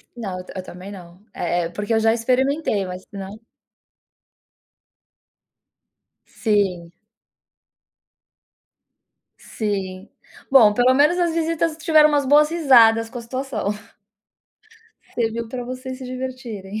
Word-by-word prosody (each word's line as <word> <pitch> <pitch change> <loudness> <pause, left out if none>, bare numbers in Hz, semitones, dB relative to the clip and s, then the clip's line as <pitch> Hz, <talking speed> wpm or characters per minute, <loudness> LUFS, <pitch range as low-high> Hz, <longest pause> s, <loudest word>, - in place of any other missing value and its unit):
Não, 195 -6 -5
eu 180 - -9
ta - - -12
eu 185 - -5
também 185 +2 -10
não, 180 -2 -13
eh 175 0 -1
eh, - - -4
porque 205 +5 -3
eu 220 - +3
já 225 0 +3
experimentei 255 -2 0
mas 180 0 -7
não 195 0 -8 2.9
Sim. 195 -6 -1 2.5
Sim. 195 -2 -5 0.4
Bom, 225 -6 +7
pelo 245 +3 +3
menos 300 +6 +4
as 345 -2 +1
visitas 330 -1 -1
tiveram 310 -1 +5
umas 290 -2 +1
boas 295 +3 +5
risadas 235 -9 +4
com 245 - -7
a - - -8
situação. 255 -3 -4 1.5
Serviu 230 0 -2
pra 245 +1 -5
vocês 255 +1 -7
se 265 - -9
divertirem. 250 -6 -6
230 Hz, 120 wpm, -21 LUFS, 200-265 Hz, 2.9 s, Bom